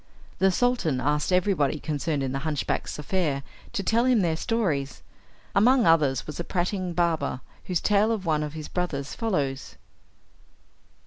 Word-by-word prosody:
The 195 Hz, -, +5 dB
Sultan 190 Hz, -, +1 dB
asked 150 Hz, +4 st, 0 dB
everybody 180 Hz, -6 st, +2 dB
concerned 150 Hz, -1 st, -2 dB
in 130 Hz, -, -2 dB
the 135 Hz, -, -2 dB
hunchback's 150 Hz, -1 st, -2 dB
affair 150 Hz, -3 st, -1 dB, 0.3 s
to 205 Hz, -4 st, -2 dB
tell 230 Hz, +4 st, +2 dB
him 250 Hz, -4 st, +4 dB
their 165 Hz, -3 st, +1 dB
stories. 160 Hz, -, -1 dB, 0.5 s
Among 245 Hz, +4 st, +5 dB
others 150 Hz, -6 st, +3 dB
was 150 Hz, -, -7 dB
a -, -, -1 dB
prating 180 Hz, 0 st, -2 dB
barber, 160 Hz, -6 st, 0 dB, 0.2 s
whose 180 Hz, -3 st, -1 dB
tale 210 Hz, +2 st, +3 dB
of 210 Hz, -4 st, -2 dB
one 155 Hz, -2 st, +1 dB
of 150 Hz, -1 st, -4 dB
his 155 Hz, -1 st, -6 dB
brothers 145 Hz, -6 st, -3 dB
follows. 145 Hz, -, -2 dB
165 Hz, 150 wpm, -26 LUFS, 145-195 Hz, 0.5 s, The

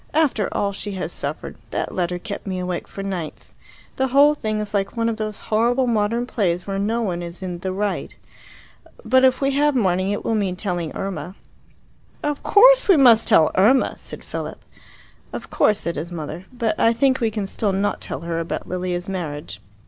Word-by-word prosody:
"After 285 Hz, -10 st, +2 dB
all 200 Hz, -, 0 dB
she 200 Hz, +1 st, -3 dB
has 185 Hz, -1 st, -4 dB
suffered. -, -, -4 dB
That -, -, -3 dB
letter 180 Hz, -1 st, -1 dB
kept 200 Hz, +3 st, -7 dB
me 190 Hz, -1 st, -2 dB
awake 180 Hz, -1 st, -3 dB
for 195 Hz, -, -7 dB
nights. 180 Hz, -5 st, -5 dB, 0.4 s
The 265 Hz, -, +2 dB
whole 280 Hz, +3 st, +5 dB
thing 215 Hz, -7 st, -2 dB
is 210 Hz, 0 st, -4 dB
like 195 Hz, +2 st, -1 dB
one 230 Hz, 0 st, +1 dB
of 225 Hz, -1 st, -1 dB
those 215 Hz, -1 st, -3 dB, 0.2 s
horrible 240 Hz, +4 st, +3 dB
modern 230 Hz, +1 st, +1 dB
plays 180 Hz, -8 st, -1 dB
where 195 Hz, -1 st, -3 dB
no 225 Hz, +4 st, 0 dB
one 175 Hz, -4 st, -2 dB
is 175 Hz, +2 st, -7 dB
in 180 Hz, -2 st, -4 dB
'the 185 Hz, +1 st, -3 dB
right.' 200 Hz, +1 st, -3 dB, 0.9 s
But 260 Hz, +3 st, +4 dB
if 260 Hz, +1 st, +4 dB
we 275 Hz, 0 st, +2 dB
have 290 Hz, +1 st, +2 dB
mourning, 185 Hz, -4 st, +1 dB
it 205 Hz, -, -3 dB
will 225 Hz, -, +1 dB
mean 200 Hz, -4 st, 0 dB
telling 175 Hz, -4 st, -3 dB
Irma." 195 Hz, -1 st, -5 dB, 0.9 s
"Of 295 Hz, -1 st, -2 dB
course -, -, +6 dB
we 375 Hz, -, +7 dB
must 235 Hz, -5 st, +6 dB
tell 155 Hz, -, +5 dB
Irma!" 230 Hz, +8 st, +4 dB
said -, -, -8 dB
Philip. -, -, -5 dB, 0.8 s
"Of -, -, -7 dB
course," 210 Hz, -, +2 dB
said 170 Hz, -2 st, -3 dB
his 165 Hz, +4 st, -5 dB
mother. 165 Hz, +2 st, -6 dB
"But 230 Hz, -4 st, -2 dB
I 230 Hz, -, +4 dB
think 260 Hz, +3 st, +2 dB
we 230 Hz, -3 st, +1 dB
can 210 Hz, -2 st, -3 dB
still 200 Hz, +1 st, -1 dB
not 195 Hz, +2 st, -1 dB
tell -, -, -5 dB
her 165 Hz, 0 st, -3 dB
about 165 Hz, -, -4 dB
Lilia's 180 Hz, 0 st, -3 dB
marriage." 150 Hz, -, -5 dB
205 Hz, 195 wpm, -22 LUFS, 180-235 Hz, 0.9 s, we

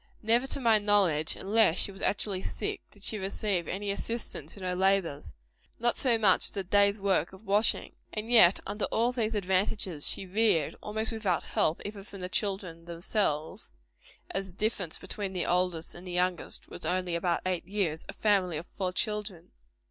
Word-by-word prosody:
Never, 235 Hz, +4 st, +3 dB
to 275 Hz, -, -2 dB
my 230 Hz, -4 st, +4 dB
knowledge, 195 Hz, -7 st, +3 dB
unless 205 Hz, -3 st, +3 dB
she 200 Hz, -, 0 dB
was 195 Hz, -, -10 dB
actually 200 Hz, -2 st, 0 dB
sick, -, -, -4 dB
did 205 Hz, -, -13 dB
she 215 Hz, -, +1 dB
receive 190 Hz, -2 st, -1 dB
any 200 Hz, +2 st, -3 dB
assistance 200 Hz, -7 st, -4 dB
in 195 Hz, -, -9 dB
her 180 Hz, 0 st, -1 dB
labors 180 Hz, -, 0 dB, 0.4 s
not 235 Hz, +1 st, +1 dB
so 245 Hz, -4 st, +5 dB
much 205 Hz, -4 st, +5 dB
as -, -, -8 dB
a 195 Hz, -, -1 dB
day's 200 Hz, +2 st, +3 dB
work 190 Hz, -4 st, +1 dB
of 190 Hz, +3 st, -14 dB
washing. 205 Hz, +2 st, +1 dB, 0.2 s
And 220 Hz, +2 st, -5 dB
yet 200 Hz, -6 st, +7 dB
under 205 Hz, +1 st, -2 dB
all 235 Hz, +2 st, +1 dB
these 230 Hz, -3 st, -1 dB
disadvantages, 190 Hz, -4 st, 0 dB
she 195 Hz, -, 0 dB
reared 190 Hz, -5 st, +2 dB
almost 220 Hz, +2 st, -2 dB
without 205 Hz, -7 st, -1 dB
help 155 Hz, -, 0 dB
even 205 Hz, -1 st, -6 dB
from 200 Hz, 0 st, -10 dB
the 180 Hz, -, -4 dB
children 185 Hz, -5 st, -2 dB
themselves, 170 Hz, -, -1 dB, 0.6 s
as 195 Hz, 0 st, -3 dB
the 185 Hz, -, -15 dB
difference 195 Hz, -4 st, -1 dB
between 200 Hz, -3 st, -5 dB
the 180 Hz, -, -1 dB
oldest 180 Hz, -2 st, 0 dB
and 175 Hz, +2 st, -10 dB
the -, -, -6 dB
youngest 180 Hz, 0 st, -1 dB
was -, -, -10 dB
only 180 Hz, -1 st, -1 dB
about 170 Hz, 0 st, 0 dB
eight 180 Hz, -2 st, -2 dB
years 185 Hz, -6 st, -1 dB
a -, -, -3 dB
family 190 Hz, -6 st, +1 dB
of 160 Hz, -, -6 dB
four 185 Hz, -1 st, -3 dB
children. 210 Hz, -3 st, -2 dB
195 Hz, 185 wpm, -29 LUFS, 180-210 Hz, 0.6 s, yet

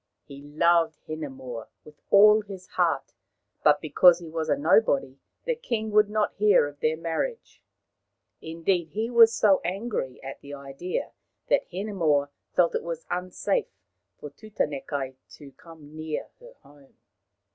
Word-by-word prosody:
He 140 Hz, -1 st, -12 dB
loved 160 Hz, +2 st, +2 dB
Hinemoa 130 Hz, -7 st, -7 dB, 0.2 s
with 150 Hz, -1 st, -17 dB
all 210 Hz, +2 st, +7 dB
his 195 Hz, -3 st, -10 dB
heart, -, -, 0 dB, 0.5 s
but -, -, +5 dB
because 175 Hz, -2 st, +5 dB
he 170 Hz, -2 st, -10 dB
was 160 Hz, -1 st, -3 dB
a -, -, +2 dB
nobody 140 Hz, -, +2 dB, 0.3 s
the -, -, +1 dB
king 235 Hz, -, -3 dB
would 210 Hz, 0 st, +4 dB
not 210 Hz, 0 st, 0 dB
hear 205 Hz, -6 st, +4 dB
of 145 Hz, 0 st, -9 dB
their 155 Hz, 0 st, 0 dB
marriage. 165 Hz, -, -4 dB, 0.8 s
Indeed, 165 Hz, 0 st, -2 dB
he 225 Hz, +4 st, -2 dB
was 230 Hz, -1 st, +7 dB
so 210 Hz, -3 st, +3 dB
angry 190 Hz, -, -3 dB
at 135 Hz, 0 st, -8 dB
the 145 Hz, 0 st, -9 dB
idea 140 Hz, +6 st, -5 dB, 0.4 s
that -, -, +2 dB
Hinemoa 170 Hz, -7 st, 0 dB, 0.2 s
felt 175 Hz, -2 st, +3 dB
it -, -, -1 dB
was 165 Hz, -1 st, -6 dB
unsafe 185 Hz, -, -1 dB, 0.5 s
for 150 Hz, -, -9 dB
Tutanekai 145 Hz, -9 st, -4 dB, 0.2 s
to 145 Hz, -2 st, -13 dB
come 155 Hz, 0 st, -15 dB
near 155 Hz, -1 st, -5 dB
her -, -, -15 dB
home. 145 Hz, -2 st, -21 dB
165 Hz, 145 wpm, -26 LUFS, 145-210 Hz, 0.8 s, all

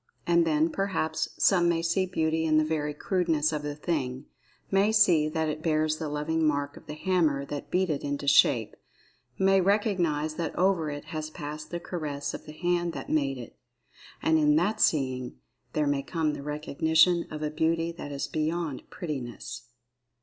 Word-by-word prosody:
And, 170 Hz, -1 st, +3 dB
then, 155 Hz, +1 st, +2 dB
perhaps, 185 Hz, -5 st, -1 dB
some 175 Hz, -3 st, +4 dB
may 165 Hz, -1 st, +1 dB
see 180 Hz, +3 st, +1 dB
beauty 160 Hz, -2 st, 0 dB
in 155 Hz, -1 st, +3 dB
the 155 Hz, -, +3 dB
very 155 Hz, -1 st, -1 dB
crudeness 160 Hz, -3 st, +1 dB
of 150 Hz, -, -2 dB
the 145 Hz, 0 st, -4 dB
thing—may 150 Hz, +7 st, -2 dB
see 180 Hz, -8 st, +4 dB
that 160 Hz, 0 st, -1 dB
it 155 Hz, 0 st, -3 dB
bears 155 Hz, -1 st, +1 dB
the 155 Hz, -2 st, -4 dB
loving 150 Hz, +2 st, -1 dB
mark 145 Hz, -1 st, 0 dB
of -, -, -14 dB
the 150 Hz, -, -6 dB
hammer 155 Hz, -5 st, +1 dB
that 145 Hz, 0 st, -6 dB
beat 185 Hz, -2 st, +1 dB
it 145 Hz, -, -3 dB
into 145 Hz, 0 st, -3 dB
shape—may 140 Hz, -, +1 dB
recognize 180 Hz, -7 st, +1 dB
that 170 Hz, -, -3 dB
over 180 Hz, -4 st, +2 dB
it 145 Hz, 0 st, -6 dB
has 155 Hz, -1 st, -5 dB
passed 150 Hz, 0 st, -7 dB
the 175 Hz, -, -4 dB
caress 150 Hz, -5 st, -4 dB
of -, -, -8 dB
the -, -, -7 dB
hand 175 Hz, +1 st, 0 dB
that -, -, -6 dB
made 140 Hz, -3 st, +1 dB
it—and 125 Hz, +6 st, -4 dB
in 150 Hz, -1 st, +4 dB
that 205 Hz, +7 st, +1 dB
seeing 130 Hz, -4 st, +1 dB, 0.4 s
there 150 Hz, -, +1 dB
may 145 Hz, -1 st, +1 dB
come 155 Hz, 0 st, -1 dB
the -, -, -6 dB
recognition 160 Hz, +4 st, +2 dB
of 155 Hz, 0 st, -6 dB
a 150 Hz, -, -1 dB
beauty 165 Hz, +1 st, 0 dB
that 165 Hz, -4 st, -8 dB
is 140 Hz, -1 st, -3 dB
beyond 155 Hz, -2 st, -2 dB
"prettiness." 130 Hz, -6 st, -6 dB
155 Hz, 170 wpm, -28 LUFS, 145-170 Hz, 0.4 s, some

